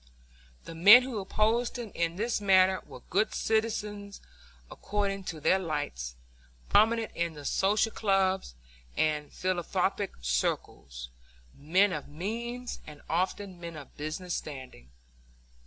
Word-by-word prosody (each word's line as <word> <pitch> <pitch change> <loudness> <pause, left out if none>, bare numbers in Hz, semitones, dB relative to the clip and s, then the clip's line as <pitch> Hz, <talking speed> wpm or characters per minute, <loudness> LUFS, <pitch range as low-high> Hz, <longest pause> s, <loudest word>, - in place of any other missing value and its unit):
The - - -8
men 205 +9 +9
who 250 -4 -4
opposed 220 +5 +1
him 235 -4 -6
in 170 0 -1
this 225 +2 -1
manner 190 -1 +4
were 130 -4 -11
good 205 +5 +1
citizens 210 -2 -1 0.5
according 200 -2 -2
to 160 -4 -5
their 185 +5 +3
lights, 145 - -3 0.5
prominent 225 +1 +4
in 170 -2 -2
the 145 -1 -10
social 210 +6 +2
clubs 190 - +1 0.4
and 150 -1 +1
in - - -23
philanthropic 185 +2 -1
circles, - - -2 0.4
men 185 +7 +2
of 150 -3 -5
means 235 +10 -5
and 150 -1 -11
often 185 +2 -1
men 170 -1 -7
of 145 -3 -11
business 160 +4 -4
standing. 130 - -7
185 Hz, 125 wpm, -29 LUFS, 155-210 Hz, 0.5 s, men